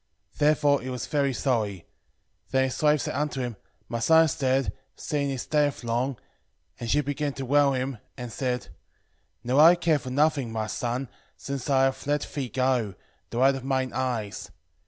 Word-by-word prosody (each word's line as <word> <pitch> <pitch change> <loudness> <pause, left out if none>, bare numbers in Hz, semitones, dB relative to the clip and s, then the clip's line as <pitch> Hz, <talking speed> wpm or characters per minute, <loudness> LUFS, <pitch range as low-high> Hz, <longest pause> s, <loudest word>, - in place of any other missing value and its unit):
10:3 - - -26
Therefore 145 -1 +3
he 130 - -6
was 125 -2 -4
very 140 -3 +1
sorry. 110 - -1 0.6
10:4 - - -38
Then 130 0 +3
his 130 -1 -2
wife 150 -2 +4
said - - -3
unto 145 0 -2
him, 120 -3 -3 0.3
My 115 - -3
son 160 +7 +6
is 155 - -1
dead, 135 -1 +1 0.2
seeing 145 -2 -2
he 135 - -2
stayeth 145 0 0
long; 120 +3 -1 0.6
and 120 - -5
she 150 - +3
began 145 0 -2
to 135 - -5
bewail 140 +1 +4
him, 130 -2 -3 0.2
and 125 -2 -6
said, 125 +1 -1
10:5 - - -17 0.7
Now 125 +3 +2
I 165 +3 +9
care 165 -3 +2
for 130 - -7
nothing, 140 -2 +1
my 110 -1 -2
son, 120 +4 -3 0.3
since 140 0 -5
I 135 -1 +4
have 135 +1 0
let 145 0 +1
thee 135 -4 -3
go, 125 -5 0 0.3
the 115 - -5
light 135 +2 +5
of 135 -1 -5
mine 130 -1 0
eyes. 120 -6 -3
135 Hz, 195 wpm, -26 LUFS, 125-145 Hz, 0.7 s, I